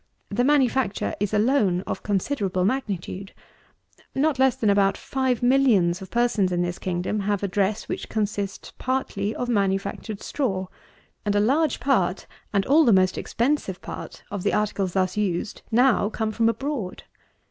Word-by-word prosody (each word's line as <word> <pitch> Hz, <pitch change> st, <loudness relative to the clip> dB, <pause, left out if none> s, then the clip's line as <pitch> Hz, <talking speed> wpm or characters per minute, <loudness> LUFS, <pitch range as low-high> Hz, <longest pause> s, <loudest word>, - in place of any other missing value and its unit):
The 220 Hz, +4 st, +1 dB
manufacture 265 Hz, -6 st, +2 dB
is 205 Hz, -1 st, -1 dB
alone 210 Hz, -4 st, +2 dB
of -, -, -5 dB
considerable 195 Hz, -3 st, 0 dB
magnitude. 200 Hz, -5 st, -3 dB, 0.8 s
Not 280 Hz, 0 st, +1 dB
less 265 Hz, -1 st, +4 dB
than 215 Hz, -3 st, +2 dB
about 200 Hz, -1 st, +3 dB
five 260 Hz, -3 st, -1 dB
millions 225 Hz, -9 st, +3 dB
of 190 Hz, -, -8 dB
persons 235 Hz, -6 st, +1 dB
in 175 Hz, 0 st, +1 dB
this 175 Hz, 0 st, -3 dB
kingdom 185 Hz, +3 st, -2 dB
have 205 Hz, 0 st, -1 dB
a -, -, +1 dB
dress 200 Hz, +2 st, 0 dB
which -, -, -5 dB
consists 205 Hz, -2 st, -3 dB
partly 235 Hz, -5 st, -1 dB
of 245 Hz, -, -3 dB
manufactured 200 Hz, -1 st, -1 dB
straw; 195 Hz, -10 st, -1 dB, 0.6 s
and 205 Hz, -1 st, 0 dB
a -, -, +4 dB
large 275 Hz, +8 st, +2 dB
part, 195 Hz, -9 st, +1 dB, 0.3 s
and 200 Hz, -1 st, +1 dB
all 305 Hz, +4 st, +5 dB
the 240 Hz, -, +4 dB
most 185 Hz, -2 st, +4 dB
expensive 235 Hz, -7 st, -1 dB
part, -, -, -8 dB
of 205 Hz, -2 st, -3 dB
the -, -, 0 dB
articles 200 Hz, -3 st, 0 dB
thus 185 Hz, 0 st, 0 dB
used, 195 Hz, -2 st, -1 dB
now 240 Hz, -3 st, +3 dB
come 220 Hz, -1 st, -2 dB
from 225 Hz, +1 st, +2 dB
abroad. 255 Hz, -6 st, -3 dB
210 Hz, 160 wpm, -24 LUFS, 190-250 Hz, 0.8 s, all